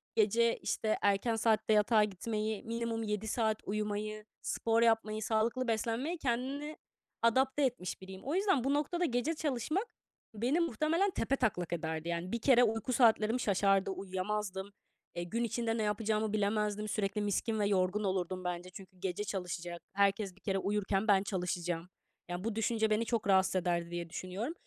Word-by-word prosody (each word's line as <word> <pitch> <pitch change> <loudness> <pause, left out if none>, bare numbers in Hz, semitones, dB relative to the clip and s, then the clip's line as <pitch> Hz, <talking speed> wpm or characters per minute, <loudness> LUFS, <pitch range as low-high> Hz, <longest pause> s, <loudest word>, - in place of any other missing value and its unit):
gece, 230 +2 +3
işte, 215 -1 -1
erken 205 +3 +2
saatte 220 -1 +2
yatağa 215 +1 +5
gitmeyi, 210 +1 -2
minimum 230 0 -2
7 210 0 -2
saat 220 -1 +1
uyumayı, 210 +1 -3 0.2
spor 230 0 +1
yapmayı, 225 -2 +2
sağlıklı 230 +4 0
beslenmeyi 230 +9 -1
kendini 275 +3 -2 0.4
adapte 265 +5 +3
etmiş 245 -11 -2
biriyim. 190 0 -9
O 290 +5 -2
yüzden 385 - +2
bu 275 +2 +1
noktada 325 +5 0
gece 245 +2 0
çalışmak 310 - -1 0.5
beni 245 +9 +1
muhtemelen 335 - +1
tepetaklak 220 - 0
ederdi. 160 -1 -3
Yani, 170 +2 -3
bir 235 - -2
kere 245 -1 +6
uyku 225 +2 0
saatlerim 225 -1 +4
şaşardı 195 -3 +2
uyuyamazdım. 190 +1 -3 0.5
Eee, 175 - -2
gün 230 +7 -2
içinde 230 0 -1
ne 220 - 0
yapacağımı 215 0 0
bilemezdim. 210 0 0
Sürekli 210 0 -1
miskin 215 +2 0
ve 205 - +2
yorgun 195 +1 +1
olurdum 185 -1 -1
bence. 180 0 -3
Çünkü 185 0 -12
gece 190 +1 -2
çalışacak. 175 -3 -4
Herkes 200 -1 +1
bir 200 - -23
kere 195 -1 0
uyurken 200 +1 0
ben 195 -2 +5
çalışacağım. 175 -3 -2 0.4
Yani, 175 +1 -4
bu 225 -1 -2
düşünce 225 0 +1
beni 215 +2 +2
çok 230 -3 -1
rahatsız 190 -1 +4
ederdi 170 -1 0
diye 175 -1 -4
düşünüyorum 185 - -4
215 Hz, 160 wpm, -33 LUFS, 190-230 Hz, 0.5 s, kere